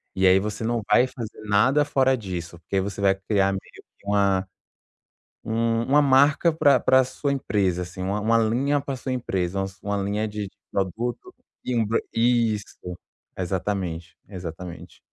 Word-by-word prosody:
e 95 - +2
aí 95 +1 +6
você 105 +2 -4
não 115 0 0
vai 120 +4 +5
fazer 115 -4 -8
nada 130 +9 +4
fora 135 -2 +2
disso, 90 -6 -6
porque 90 +4 -3
aí - - +3
você 100 0 -5
vai 95 -1 +4
criar 95 0 +1
meio 95 0 -3 0.4
que 100 - -19
uma 100 -2 +2 1.0
um 115 +1 0
uma 145 +2 +4
marca 145 +4 +4
pra 150 -3 +4
pra 130 0 +4
sua 140 +2 -2
empresa, 100 -9 0
assim, 90 +1 -7
uma 100 +3 -1
uma 115 +2 +3
linha 130 +6 +1
pra 140 -1 -4
sua 130 +1 -4
empresa, 95 -7 -2
umas 95 +1 -5
uma 100 0 -2
linha 100 +2 -1
de 105 -2 -5 0.2
produto, 120 - -3 0.3
e 125 - -1
um 115 -2 +2
bran 115 - +1
isso, 115 -6 0 0.4
exatamente, 90 -2 -3
exatamente. 90 -2 -8
105 Hz, 165 wpm, -24 LUFS, 95-125 Hz, 1.0 s, aí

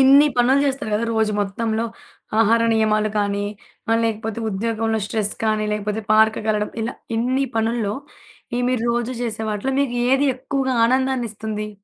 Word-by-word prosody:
ఇన్ని 275 +2 +7
పనులు 260 +3 +4
చేస్తారు 270 -5 -2
కదా! 215 +2 0
రోజు 220 -1 +1
మొత్తంలో 220 +3 -1 0.6
ఆహార 230 +1 +4
నియమాలు 215 -1 +2
కానీ, 205 0 0 0.5
ఆహ్, 225 - +4
లేకపోతే 225 0 -2
ఉద్యోగంలో 225 +2 -1
స్ట్రెస్ 210 -1 -2
కానీ, 215 -1 +1
లేకపోతే 210 +1 -2
పార్క్ 220 0 +4
కెళ్లడం. 210 -1 0
ఇలా 235 +3 -3 0.2
ఇన్ని 255 +4 +1
పనుల్లో, 225 -2 0 0.6
ఈ - - 0
మీరు 250 -3 0
రోజు 240 +1 -1
చేసే 220 -2 -3
వాటిలో, 215 +6 -2
మీకు 255 -4 0 0.2
ఏది 275 +2 +3
ఎక్కువగా 265 0 -1
ఆనందాన్ని 260 -1 +1
ఇస్తుంది? 215 0 -4
225 Hz, 150 wpm, -21 LUFS, 215-250 Hz, 0.6 s, ఇన్ని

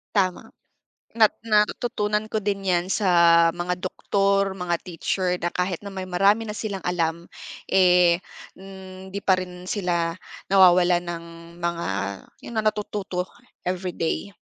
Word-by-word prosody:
Tama. 185 -3 +1 0.7
Nat 220 -2 +5 0.2
natutunan 210 0 +1
ko 220 0 -3
din 200 -1 -2
'yan 180 -1 +2
sa 170 -4 +5
mga 175 +1 -2
doktor, 195 +1 0
mga 175 -1 -2
teacher 180 +1 -2
na 175 0 -3
kahit 180 -1 -1
na 200 - -7
may 185 -1 -6
marami 200 +5 +3
na 210 - -5
silang 200 -4 -4
alam, 170 -1 -2 0.4
eh, 180 -2 +5 0.4
hindi 190 0 -9
pa 190 -1 +3
rin 180 0 -7
sila 170 -4 -1 0.3
nawawalan 180 -2 +5
ng 170 -1 -5 0.4
mga 170 0 -2 0.6
'yon - - -9
na, 215 - 0
natututo 205 -3 -2 0.3
everyday. 180 +1 -3
185 Hz, 130 wpm, -24 LUFS, 175-200 Hz, 0.7 s, Nat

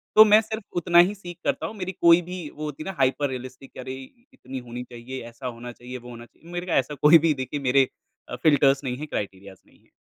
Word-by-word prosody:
तो 215 - +10
मैं 215 +1 +6
सिर्फ़ 220 -1 -6
उतना 175 0 +4
ही 185 +4 +5
सीक 175 -3 -10
करता - - -1
हूँ। 220 - -9
मेरी 185 0 -4
कोई 170 +1 +7
भी 175 -2 -7
वो 155 - -7
होती 150 +1 -6
है 195 - -6
ना 190 - -6
हाइपर 135 +2 +2
रियलिस्टिक 130 +1 -8
कि - - -12
अरे, 130 +1 -6 0.4
इतनी 130 - -8
होनी 120 0 -7
चाहिए, 125 +2 -8
ऐसा 125 +3 -8
होना 120 0 -7
चाहिए, 125 +1 -9
वो 125 0 -12
होना 120 0 -10
चाहिए, 165 +8 -18
मेरे 175 +1 -3
को 180 - -5
ऐसा 140 +3 +1
कोई 155 +3 +8
भी 155 - +3
देखिए 145 +3 -5
मेरे 135 0 +4 0.6
फिल्टर्स 140 -2 +4
नहीं 125 -2 -3
हैं, 150 +2 -6
क्राइटीरियाज़ 100 -5 -6
नहीं - - -25
हैं। - - -31
140 Hz, 245 wpm, -25 LUFS, 125-175 Hz, 0.6 s, तो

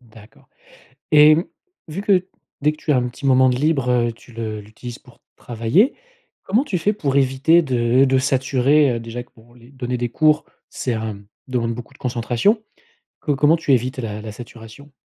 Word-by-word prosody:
D'accord. 110 0 -19 0.6
Et 150 0 +7
mmh, 165 - 0 0.4
vu 160 +6 -5
que 195 -3 +2 0.4
dès 150 +1 +3
que 155 - -12
tu 155 - -2
as 135 - +4
un 125 0 0
petit 130 - -10
moment 130 -1 +5
de 125 - 0
libre, 140 -2 0
heu, 120 -1 +2
tu 120 +2 -17
le 110 -2 -5
l'utilises 115 +4 -10
pour 125 -3 -21 0.2
travailler, 120 - +1 0.5
comment 220 +7 +1
tu 200 -11 -2
fais 205 +6 +1
pour 140 -9 -2
éviter 140 +5 +3
de 125 -1 +2
de 130 0 +2
saturer? 135 +1 +2
Heu - - -3
déjà 115 +1 -6
que - - -30
bon 120 +1 -20
les 120 0 -18
donner 125 -2 -4
des 120 0 -2
cours, 155 +4 +2 0.2
c'est 125 - -3
hem 110 -3 -4 0.2
demande 115 -2 -1
beaucoup 120 +3 -10
de - - -19
concentration. 125 - 0 0.6
Co 145 -2 0
comment 150 +4 +4
tu 150 - -1
évites 130 +1 0
la 105 -3 -5
la 110 -1 -7
saturation? 120 +4 -12
130 Hz, 195 wpm, -20 LUFS, 120-150 Hz, 0.6 s, Et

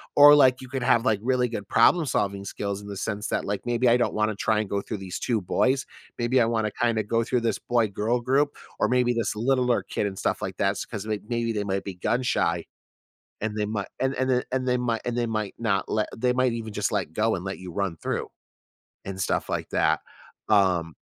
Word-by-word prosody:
or, 145 0 +9
like, 130 -3 +5
you 130 - -10
could 135 -2 -3
have, 120 -1 +3
like, 105 -5 +2
really 125 -1 +1
good 105 -4 -5
problem 155 +8 +4
solving 100 -5 -1
skills 100 0 -4
in 100 - -10
the 100 - -6
sense 105 +1 -3
that, - - -1
like, 100 0 -2
maybe 120 0 +2
I 120 - +5
don't 120 - 0
wanna 110 0 0
try 110 +1 +1
and 105 - -3
go 100 0 -1
through 110 - -5
these 95 -2 -6
2 115 -4 0
boys, 130 +8 +1 0.3
maybe 120 +2 +2
I - - +4
wanna 110 -2 0
kinda 115 -3 +2
go 115 +2 0
through 125 0 0
this 115 - 0
boy-girl 115 0 0
group 140 +4 +1 0.2
or - - +3
maybe 125 -1 +2
this 115 -2 -1
littler 125 +1 +2
kid - - -2
and 95 -2 -4
stuff - - -1
like - - -4
that 100 0 +2
s - - -5
‘cause, 105 -2 -6
like, 105 -1 -2
maybe 115 -1 -1
they 105 -1 -1
might 95 -1 -2
be 95 -2 -5
gun 115 +7 0
shy 85 -8 0 0.8
and 110 0 -2
they 105 - 0
might 105 -2 -3
and 135 +1 0
and 130 0 0
a 125 0 +2
and 130 -1 0
they 125 0 +2
might 120 -2 -1
and 120 0 -2
they 120 - +1
might 110 -2 -3
not 105 -4 0
let 105 -1 0
they 125 +2 +2
might 130 -1 +2
even 115 -2 -5
just 105 0 -1
let 90 -6 -1
go 110 +2 +1
and 90 - -5
let 95 0 -5
you 90 -1 -8
run 95 -4 -2
through - - -3 0.8
and 95 -1 -6
stuff - - -1
like - - -2
that, - - +2 0.5
um 90 -7 +3
110 Hz, 240 wpm, -26 LUFS, 100-125 Hz, 0.8 s, or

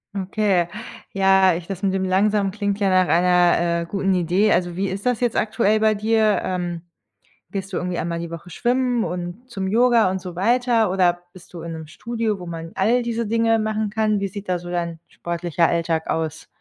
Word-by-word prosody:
Okay, 195 -2 +1 0.5
ja, 190 -1 +4
ich 170 0 -5
das 195 0 -6
mit 195 -1 +1
dem 190 0 0
langsam 195 +2 +2
klingt 200 0 -2
ja 200 -2 +2
nach 185 -1 +3
einer, 175 0 +3
äh, - - -7
guten 195 +1 0
Idee. 180 +5 +2
Also, 175 -1 +1
wie 195 +2 -1
ist 195 +3 -5
das 250 -3 +1
jetzt 240 -2 0
aktuell 215 -1 +2
bei 215 0 +3
dir? 215 0 +2
Ähm, 175 -2 -3 0.7
gehst 195 0 -5
du - - -1
irgendwie 180 -1 -3
einmal 170 +1 -2
die 170 0 -6
Woche 170 +1 -9
schwimmen 245 +4 0
und 175 +7 -6
zum 195 -4 -3
Yoga 230 -1 +4
und 190 0 -3
so 180 -2 -8
weiter, 230 +1 +2
oder 175 -2 +2
bist 180 0 -16
du 170 - -7
in 170 0 -6
'nem 160 -1 -7
Studio, 225 +5 -3
wo 180 - -8
man 165 -1 -7
all 225 +6 +2
diese 235 -1 -2
Dinge 225 +1 +2
machen 215 0 -1
kann? 215 0 0
Wie 200 - -1
sieht 200 -1 -7
da 180 - +1
so 175 0 -10
dein 170 -2 -3
sportlicher 170 -1 -1
Alltag 165 -1 -1
aus? 160 0 -3
190 Hz, 205 wpm, -22 LUFS, 175-215 Hz, 0.7 s, ja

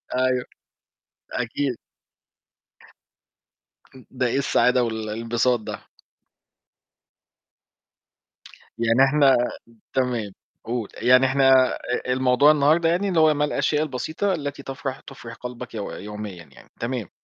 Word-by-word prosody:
أيوة، 130 -1 +1 0.9
أكيد. 125 +1 -2 2.2
امم، 130 - -15
ده 130 -1 0
إيه 120 - -1
السعادة 125 -2 +2
وال 115 -2 -2
الانبساط 115 +3 0
ده؟ 110 - -8 2.9
يعني 115 +3 +3
إحنا 140 -2 +4 0.6
تمام، 120 -6 -1 0.3
قُل، 115 -2 -3
يعني 125 +3 +4
إحنا 135 -1 +4
أ - - -6 0.4
الموضوع 130 +3 +4
النهاردة 155 +3 +3
يعني 180 +4 +1
اللي 175 -4 +2
هو 155 -1 +5
ما 145 0 +1
الأشياء 150 0 0
البسيطة 155 +7 -2
التي 145 -3 -5
تَفرَح 135 0 -5
تُفرِح 120 -4 -11
قلبك 125 0 -8
يو 105 -3 -4
يوميًا 105 -4 -8
يعني؟ - - -19
تمام. 120 -5 -3
130 Hz, 110 wpm, -23 LUFS, 115-140 Hz, 2.9 s, هو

